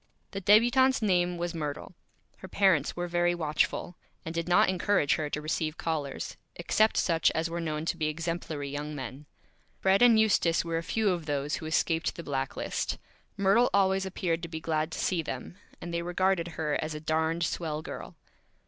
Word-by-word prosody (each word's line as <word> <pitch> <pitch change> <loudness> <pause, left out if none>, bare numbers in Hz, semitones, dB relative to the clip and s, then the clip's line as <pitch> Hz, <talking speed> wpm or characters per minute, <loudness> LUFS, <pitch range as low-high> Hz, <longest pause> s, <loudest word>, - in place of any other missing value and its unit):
The 195 - -5
Débutante's 240 +5 +4
name 180 -3 +2
was 175 0 -3
Myrtle. 150 +1 -5 0.4
Her 190 - -10
Parents 185 -8 +2
were 175 0 -3
very 175 0 +1
Watchful, 160 +2 -1 0.3
and 160 - -4
did 170 +1 -3
not 175 - +5
encourage 185 -4 +2
her 150 -2 -1
to 150 - -3
receive 155 0 -2
Callers, 150 -4 -3 0.2
except 215 +6 +2
such 165 -2 +3
as 165 +1 -1
were 170 0 -3
known 155 -1 -3
to - - -1
be 155 - 0
Exemplary 160 -2 -3
Young 145 +2 -5
Men. 135 +2 -7 0.5
Fred 190 +2 +3
and 235 -2 +7
Eustace 175 -7 +3
were 165 -1 -1
a - - -4
few 210 +4 0
of 170 -3 -3
those 145 0 -1
who 160 - -7
escaped 160 +1 0
the 170 - -7
Black 135 -3 -3
List. - - -2 0.4
Myrtle 200 +5 +4
always 190 -1 +3
appeared 175 -3 -2
to 170 - -5
be 160 -1 -5
glad 160 0 -1
to - - -5
see 180 -3 0
them, 145 +4 -6 0.2
and 170 - -7
they 170 - -1
regarded 175 0 +1
her 150 -2 -1
as 155 0 -4
a - - -4
Darned 160 +2 0
Swell 155 -2 -2
Girl. - - -8
165 Hz, 190 wpm, -29 LUFS, 155-185 Hz, 0.5 s, and